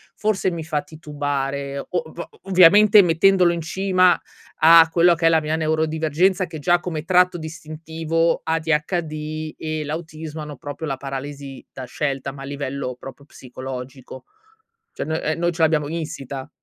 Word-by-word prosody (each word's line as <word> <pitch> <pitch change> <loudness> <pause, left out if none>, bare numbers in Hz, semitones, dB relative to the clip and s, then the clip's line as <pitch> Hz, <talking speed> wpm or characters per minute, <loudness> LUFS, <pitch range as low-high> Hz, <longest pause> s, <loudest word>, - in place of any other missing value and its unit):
forse 210 -3 0
mi 165 -2 -5
fa 150 -2 -1
titubare. 140 -3 -4
O - - -7
o 170 -1 -5
ovviamente 195 +3 +7
mettendolo 180 +1 +3
in 170 - -4
cima 185 +2 +2 0.4
a 165 +1 +7
quello 170 +1 +4
che 165 - +2
è - - +6
la 165 -1 +4
mia 155 0 -2
neurodivergenza, 160 +3 +1
che 160 - -9
già, 175 +4 +2
come 160 -3 -5
tratto 180 0 +3
distintivo, 160 +1 -2
ADHD 155 -1 -2
e 155 -1 -4
l'autismo, 155 0 -6
hanno 150 -2 -8
proprio 145 +4 -7
la 135 - -3
paralisi 135 0 -7
da 130 - -8
scelta, 135 +1 -3
ma 140 - -11
a - - -7
livello 140 -2 -5
proprio 135 +1 -11
psicologico. 130 -1 -9 0.7
Cioè - - -5
no 160 +1 -2
ehm, 155 +2 -1
noi 175 +1 0
ce 165 0 -5
l'abbiamo 155 -2 +2
insita, 140 -4 -6
155 Hz, 155 wpm, -21 LUFS, 145-170 Hz, 0.7 s, ovviamente